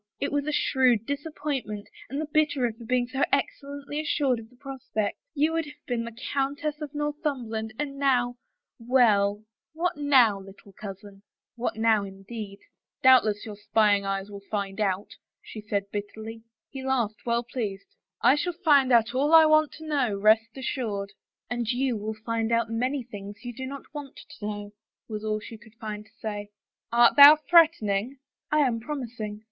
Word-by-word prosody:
It 280 Hz, -, -1 dB
was 290 Hz, 0 st, -1 dB
a -, -, +1 dB
shrewd 255 Hz, -6 st, +2 dB
disappointment, 285 Hz, -7 st, -4 dB, 0.2 s
and 275 Hz, +4 st, -3 dB
the 310 Hz, -, -1 dB
bitterer 290 Hz, -6 st, +1 dB
for 230 Hz, +1 st, -12 dB
being 245 Hz, +1 st, +1 dB
so 265 Hz, +2 st, -4 dB
excellently 285 Hz, +1 st, -2 dB
assured 280 Hz, -5 st, +1 dB
of 225 Hz, 0 st, -12 dB
the 250 Hz, -, -22 dB
prospect. 250 Hz, -6 st, -4 dB, 0.2 s
You 305 Hz, +3 st, +2 dB
would 330 Hz, -1 st, 0 dB
have 295 Hz, 0 st, -14 dB
been 240 Hz, -3 st, -2 dB
the 230 Hz, -1 st, -9 dB, 0.2 s
Countess 290 Hz, +2 st, -1 dB
of 295 Hz, -1 st, -6 dB
Northumberland, 275 Hz, -7 st, -3 dB
and 275 Hz, -2 st, -4 dB
now 245 Hz, -3 st, +2 dB, 0.2 s
— -, -, -63 dB
well, 215 Hz, -4 st, +3 dB, 0.3 s
what 345 Hz, +1 st, -1 dB
now, 260 Hz, -8 st, +4 dB
little 195 Hz, +1 st, -14 dB
cousin? 195 Hz, 0 st, -10 dB, 0.2 s
" -, -, -67 dB
What 240 Hz, +1 st, -2 dB
now, 220 Hz, -2 st, +3 dB
indeed? 200 Hz, +1 st, -8 dB, 0.2 s
" -, -, -53 dB
Doubtless 230 Hz, -6 st, +5 dB
your 215 Hz, -2 st, -7 dB
spying 205 Hz, -1 st, +2 dB
eyes 195 Hz, +1 st, -3 dB
will 200 Hz, 0 st, -8 dB
find 200 Hz, -1 st, -3 dB
out," 200 Hz, +2 st, -1 dB, 0.2 s
she 215 Hz, -, -10 dB
said 200 Hz, -1 st, -3 dB
bitterly. 220 Hz, +2 st, -6 dB, 0.3 s
He 270 Hz, -, -6 dB
laughed, 235 Hz, -6 st, -1 dB
well 235 Hz, 0 st, 0 dB
pleased. 210 Hz, -5 st, -5 dB, 0.2 s
" -, -, -59 dB
I -, -, +7 dB
shall 345 Hz, +5 st, -1 dB
find 295 Hz, -7 st, +4 dB
out 235 Hz, 0 st, +4 dB
all 290 Hz, +5 st, +4 dB
I 320 Hz, -1 st, +9 dB
want 310 Hz, -1 st, +4 dB
to 315 Hz, -, -10 dB
know, 270 Hz, -9 st, +1 dB
rest 220 Hz, +3 st, +3 dB
assured." 215 Hz, -7 st, -3 dB, 0.2 s
" -, -, -59 dB
And 240 Hz, -2 st, -2 dB
you 255 Hz, 0 st, +1 dB
will 215 Hz, +1 st, -4 dB
find 230 Hz, -1 st, -1 dB
out 230 Hz, -1 st, +1 dB
many 255 Hz, +4 st, -1 dB
things 205 Hz, +1 st, -10 dB
you 245 Hz, -, -5 dB
do 260 Hz, +2 st, -6 dB
not 280 Hz, +1 st, -7 dB
want 290 Hz, -3 st, -7 dB
to 205 Hz, -, -11 dB
know," 205 Hz, -1 st, -6 dB, 0.3 s
was 215 Hz, -1 st, -5 dB
all 215 Hz, 0 st, -1 dB
she 220 Hz, +1 st, -10 dB
could 220 Hz, 0 st, -18 dB
find 215 Hz, -2 st, -6 dB
to -, -, -27 dB
say. 205 Hz, -2 st, -5 dB, 0.4 s
"Art 235 Hz, 0 st, +5 dB
thou 285 Hz, +2 st, +12 dB
threatening?" 280 Hz, -, +3 dB, 0.2 s
" -, -, -51 dB
I 305 Hz, 0 st, +4 dB
am 245 Hz, -5 st, +1 dB
promising. 235 Hz, -5 st, -5 dB
235 Hz, 185 wpm, -26 LUFS, 210-280 Hz, 0.4 s, thou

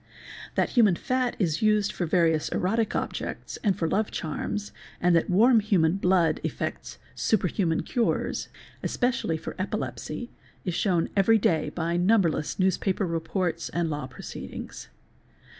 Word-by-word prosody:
That -, -, +1 dB
human 215 Hz, -8 st, +5 dB
fat 255 Hz, +4 st, -1 dB
is 165 Hz, -6 st, 0 dB
used 215 Hz, -2 st, +3 dB
for 175 Hz, -, -3 dB
various 160 Hz, -2 st, +2 dB
erotic 220 Hz, +4 st, 0 dB
objects -, -, -4 dB
and 200 Hz, -4 st, +2 dB
for 165 Hz, -, 0 dB
love 210 Hz, +5 st, 0 dB
charms, 205 Hz, +6 st, -4 dB, 0.3 s
and 180 Hz, -1 st, +3 dB
that 165 Hz, -, +2 dB
warm 225 Hz, +6 st, +5 dB
human 190 Hz, -5 st, +2 dB
blood 180 Hz, -4 st, +2 dB
effects -, -, -4 dB, 0.2 s
superhuman 185 Hz, -5 st, +1 dB
cures, 240 Hz, -2 st, -1 dB, 0.3 s
especially 245 Hz, -10 st, 0 dB
for -, -, -7 dB
epilepsy, 215 Hz, +4 st, -4 dB, 0.3 s
is 180 Hz, -, -1 dB
shewn 175 Hz, -2 st, +1 dB
every 210 Hz, +3 st, +5 dB
day 160 Hz, -7 st, +1 dB
by 170 Hz, +2 st, -2 dB
numberless 175 Hz, -5 st, +2 dB
newspaper 190 Hz, +1 st, +1 dB
reports 165 Hz, 0 st, -2 dB
and 170 Hz, 0 st, -1 dB
f -, -, -2 dB
law 145 Hz, -3 st, -3 dB
proceedings 130 Hz, -, -8 dB
®®. -, -, -33 dB
185 Hz, 140 wpm, -27 LUFS, 165-210 Hz, 0.3 s, human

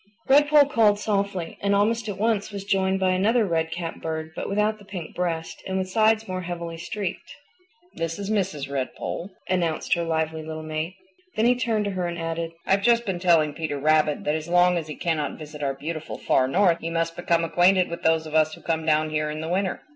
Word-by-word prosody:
Redpoll 290 Hz, +1 st, +5 dB
called 215 Hz, -5 st, +4 dB
softly 200 Hz, -4 st, -2 dB
and 200 Hz, 0 st, +2 dB
almost 220 Hz, +2 st, +1 dB
at 195 Hz, -, -4 dB
once 215 Hz, -1 st, 0 dB
was 200 Hz, -1 st, -5 dB
joined 190 Hz, -1 st, +1 dB
by 190 Hz, -1 st, +2 dB
another 215 Hz, +5 st, +3 dB
red 165 Hz, -3 st, 0 dB
capped 165 Hz, 0 st, -5 dB
bird 160 Hz, 0 st, -4 dB
but -, -, -4 dB
without 210 Hz, +2 st, +1 dB
the -, -, -14 dB
pink 185 Hz, -5 st, -7 dB
breast, 165 Hz, -2 st, -3 dB
and 190 Hz, 0 st, -1 dB
with 185 Hz, 0 st, -2 dB
sides 220 Hz, +1 st, +3 dB
more 185 Hz, -1 st, -3 dB
heavily 170 Hz, -1 st, -5 dB
streaked. 185 Hz, +2 st, -5 dB, 0.6 s
"This 165 Hz, 0 st, -3 dB
is 200 Hz, +1 st, -4 dB
Mrs. 185 Hz, -9 st, -1 dB
Redpoll," 140 Hz, +6 st, -4 dB, 0.2 s
announced 175 Hz, -4 st, 0 dB
her 170 Hz, -, +1 dB
lively 160 Hz, -1 st, -1 dB
little 155 Hz, 0 st, -6 dB
mate. 155 Hz, +3 st, -4 dB, 0.4 s
Then 220 Hz, -, +2 dB
he 245 Hz, -, +6 dB
turned 230 Hz, -4 st, 0 dB
to 200 Hz, -, -1 dB
her 185 Hz, -2 st, -2 dB
and 170 Hz, 0 st, -4 dB
added, 165 Hz, 0 st, -3 dB
"I've 195 Hz, +1 st, +2 dB
just 235 Hz, +2 st, +3 dB
been 190 Hz, -4 st, -2 dB
telling 165 Hz, -4 st, +3 dB
Peter 155 Hz, -3 st, -3 dB
Rabbit 155 Hz, +1 st, +2 dB
that 150 Hz, -, 0 dB
as 155 Hz, 0 st, -3 dB
long 180 Hz, 0 st, +4 dB
as 165 Hz, -2 st, -2 dB
he 150 Hz, -, -6 dB
cannot 155 Hz, -4 st, -2 dB
visit 150 Hz, -1 st, -9 dB
our 135 Hz, -1 st, -1 dB
beautiful 155 Hz, +3 st, -5 dB
Far 130 Hz, -, +2 dB
North 175 Hz, +3 st, +3 dB
he 165 Hz, -, -3 dB
must 165 Hz, 0 st, -1 dB
become 170 Hz, -1 st, +1 dB
acquainted 175 Hz, +3 st, +4 dB
with 170 Hz, -, -6 dB
those 160 Hz, 0 st, +2 dB
of 155 Hz, -, -8 dB
us 155 Hz, 0 st, +3 dB
who -, -, -17 dB
come 160 Hz, -1 st, -1 dB
down 155 Hz, 0 st, +2 dB
here 155 Hz, 0 st, 0 dB
in 150 Hz, 0 st, -4 dB
the 160 Hz, -, -4 dB
winter. 190 Hz, +1 st, -1 dB
175 Hz, 220 wpm, -25 LUFS, 160-200 Hz, 0.6 s, he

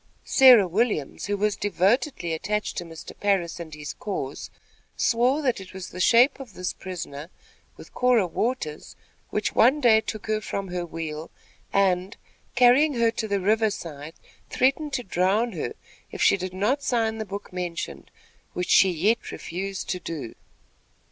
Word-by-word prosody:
Sarah 250 Hz, -8 st, +7 dB
Williams, 195 Hz, -, -1 dB
who 205 Hz, 0 st, -1 dB
was 210 Hz, +1 st, +1 dB
devotedly 205 Hz, -, 0 dB
attached 210 Hz, +6 st, -2 dB
to 175 Hz, -, -2 dB
Mr. 165 Hz, -2 st, -10 dB
Parris 195 Hz, -5 st, 0 dB
and 165 Hz, -2 st, -7 dB
his 150 Hz, -1 st, -7 dB
cause, 145 Hz, -9 st, -5 dB, 0.5 s
swore 250 Hz, +6 st, +2 dB
that 250 Hz, -7 st, 0 dB
it 185 Hz, -, -12 dB
was 190 Hz, -1 st, -7 dB
the 180 Hz, -, -9 dB
shape 240 Hz, +9 st, +5 dB
of 245 Hz, -8 st, -10 dB
this 180 Hz, 0 st, -3 dB
prisoner, 165 Hz, -5 st, -7 dB, 0.5 s
with -, -, -14 dB
Cora 250 Hz, -5 st, +3 dB
Waters, 180 Hz, -5 st, -3 dB, 0.3 s
which 210 Hz, 0 st, -1 dB
one 260 Hz, +6 st, +5 dB
day 225 Hz, -5 st, +5 dB
took 215 Hz, -1 st, -6 dB
her 215 Hz, 0 st, -1 dB
from 195 Hz, -2 st, -4 dB
her 175 Hz, -1 st, -3 dB
wheel 160 Hz, -1 st, -6 dB, 0.4 s
and, 190 Hz, -1 st, +1 dB, 0.4 s
carrying 255 Hz, +4 st, +5 dB
her 230 Hz, -1 st, +3 dB
to 225 Hz, -1 st, -3 dB
the 200 Hz, -1 st, 0 dB
river 215 Hz, +3 st, +2 dB
side, 155 Hz, -5 st, -8 dB, 0.3 s
threatened 275 Hz, +4 st, +1 dB
to 250 Hz, -2 st, -1 dB
drown 195 Hz, +5 st, +1 dB
her, 155 Hz, -, -4 dB, 0.4 s
if -, -, -8 dB
she -, -, +5 dB
did 185 Hz, -1 st, -5 dB
not 225 Hz, +9 st, +1 dB
sign 225 Hz, -4 st, 0 dB
the -, -, -1 dB
book 200 Hz, -1 st, -8 dB
mentioned, 175 Hz, -2 st, -5 dB, 0.4 s
which 180 Hz, 0 st, -3 dB
she 195 Hz, -, +6 dB
yet 195 Hz, +7 st, 0 dB
refused 195 Hz, +3 st, -5 dB
to 180 Hz, -, -1 dB
do. 160 Hz, -9 st, -6 dB
200 Hz, 160 wpm, -25 LUFS, 175-230 Hz, 0.5 s, Sarah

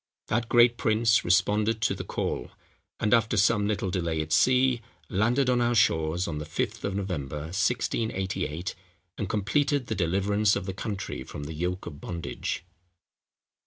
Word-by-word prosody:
That 120 Hz, -1 st, 0 dB
great 120 Hz, 0 st, +5 dB
prince 110 Hz, 0 st, +3 dB
responded 105 Hz, +5 st, +2 dB
to -, -, +2 dB
the -, -, -5 dB
call, -, -, -3 dB, 0.5 s
and, 105 Hz, -, +2 dB
after 115 Hz, -2 st, +3 dB
some 105 Hz, +1 st, +3 dB
little 100 Hz, -3 st, -1 dB
delay 85 Hz, -3 st, -1 dB
at 75 Hz, 0 st, -3 dB
sea, 130 Hz, -1 st, +4 dB, 0.3 s
landed 115 Hz, +7 st, +2 dB
on 125 Hz, -1 st, +3 dB
our 120 Hz, 0 st, +2 dB
shores 85 Hz, -4 st, +2 dB
on 75 Hz, -3 st, -3 dB
the 75 Hz, -, -5 dB
Fifth 75 Hz, -, -3 dB
of 100 Hz, -1 st, -2 dB
November, 75 Hz, -8 st, -3 dB
1688, 95 Hz, -5 st, -1 dB, 0.5 s
and 100 Hz, -, -2 dB
completed 140 Hz, +7 st, +1 dB
the 110 Hz, -, -3 dB
deliverance 100 Hz, +3 st, +2 dB
of 100 Hz, -, -3 dB
the 95 Hz, -, -4 dB
country 100 Hz, -, -4 dB
from 70 Hz, -, -8 dB
the 75 Hz, +3 st, -6 dB
yoke 90 Hz, +4 st, -3 dB
of 75 Hz, -4 st, -8 dB
bondage. 85 Hz, -2 st, -4 dB
100 Hz, 160 wpm, -27 LUFS, 90-115 Hz, 0.5 s, great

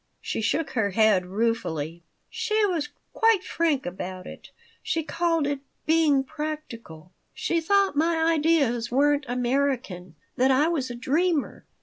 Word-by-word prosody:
She -, -, -4 dB
shook 300 Hz, +8 st, 0 dB
her 220 Hz, -4 st, 0 dB
head 200 Hz, -2 st, +3 dB
ruefully. 180 Hz, -7 st, -2 dB, 0.2 s
"She 430 Hz, 0 st, 0 dB
was 335 Hz, -7 st, -1 dB, 0.2 s
quite 450 Hz, -5 st, +3 dB
frank 315 Hz, -5 st, 0 dB
about 185 Hz, +1 st, -6 dB
it. -, -, -11 dB, 0.3 s
She 325 Hz, -, -1 dB
called 330 Hz, -1 st, 0 dB
it 285 Hz, -1 st, -1 dB, 0.3 s
being 310 Hz, -4 st, +3 dB
practical. 270 Hz, -, -7 dB, 0.2 s
She 335 Hz, -1 st, 0 dB
thought 395 Hz, +1 st, +2 dB
my 325 Hz, +3 st, +2 dB, 0.2 s
ideas 285 Hz, -7 st, +1 dB
weren't 290 Hz, +3 st, +2 dB
American, 245 Hz, -, -1 dB, 0.2 s
that 260 Hz, +2 st, +3 dB
I 280 Hz, +5 st, +3 dB
was 280 Hz, -7 st, -1 dB
a 240 Hz, -, -6 dB
dreamer. 305 Hz, +5 st, -1 dB
280 Hz, 135 wpm, -25 LUFS, 225-325 Hz, 0.3 s, head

